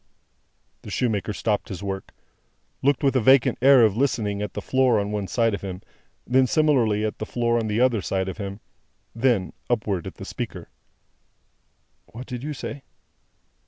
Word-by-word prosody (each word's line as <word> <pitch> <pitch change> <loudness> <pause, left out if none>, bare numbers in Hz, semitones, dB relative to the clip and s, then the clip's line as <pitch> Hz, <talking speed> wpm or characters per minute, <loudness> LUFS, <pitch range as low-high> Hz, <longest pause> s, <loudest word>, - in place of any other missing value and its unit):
The - - -10
shoemaker 105 -6 -1
stopped 105 0 -1
his 95 0 -6
work; 95 -1 -5 0.7
looked 140 0 +2
with 135 -1 +2
a 130 - +3
vacant 130 +2 +4
air 135 -2 +7
of 105 -3 +3
listening, 110 -6 0
at 105 - -4
the - - -2
floor 130 -4 +2
on 100 0 -2
one 105 -2 -2
side 115 0 +1
of 100 - -3
him; 95 -1 -6 0.4
then 130 +1 +3
similarly, 120 -9 +2
at 110 - -4
the 110 - -3
floor 120 -1 +1
on 110 - -2
the 105 +1 0
other 125 -5 +3
side 95 0 -1
of 95 - -6
him; 100 +1 -6 0.5
then, 115 -6 +1 0.2
upward 105 -7 -1
at - - -8
the - - -9
speaker. - - -6 1.4
"What 120 +3 -9
did 125 -2 -6
you 150 +1 -3
say?" 140 +1 -6
115 Hz, 175 wpm, -24 LUFS, 100-130 Hz, 1.4 s, air